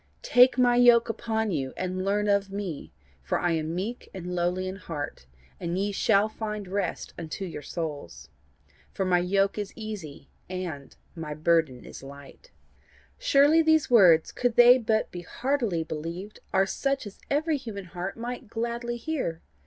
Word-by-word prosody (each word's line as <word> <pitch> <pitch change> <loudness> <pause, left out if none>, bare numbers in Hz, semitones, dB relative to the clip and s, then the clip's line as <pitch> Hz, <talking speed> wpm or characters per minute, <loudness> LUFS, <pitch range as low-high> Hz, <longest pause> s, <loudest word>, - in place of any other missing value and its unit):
Take 250 +1 +6
my 245 -1 +4
yoke 240 -1 +6
upon 220 -1 -1
you, 135 -6 -2
and 185 0 -2
learn 205 +2 +1
of 200 -1 +2
me; 195 -7 -5 0.3
for 65 - -1
I 175 - +1
am 160 0 -1
meek 215 +7 -4
and 180 -1 -5
lowly 180 +1 0
in 190 +1 -5
heart: 145 - -6 0.3
and 170 0 -2
ye 200 +2 0
shall 200 +1 +3
find 210 -2 -5
rest 190 -1 -3
unto 165 +4 -5
your 165 -4 -6
souls. 145 - -6 0.6
For 190 - -2
my 180 -1 +3
yoke 195 +3 +1
is 205 -1 -4
easy, 200 -11 -8 0.2
and 175 -7 -6 0.2
my 155 -3 -5
burden 155 -5 +1
is - - -10
light'? 140 - -13 0.7
"Surely 310 - +5
these 315 -3 +3
words, 175 -9 +6
could 245 -2 -1
they 245 +1 +8
but 220 -2 0
be 175 - -6
heartily 235 -4 -1
believed, 165 +6 -6
are 190 0 +3
such 275 +7 -1
as 205 - -10
every 305 +2 +1
human 220 -7 -7
heart 180 +3 -6
might 245 +1 -5
gladly 235 +2 -3
hear! 235 - -3
195 Hz, 160 wpm, -27 LUFS, 170-235 Hz, 0.7 s, they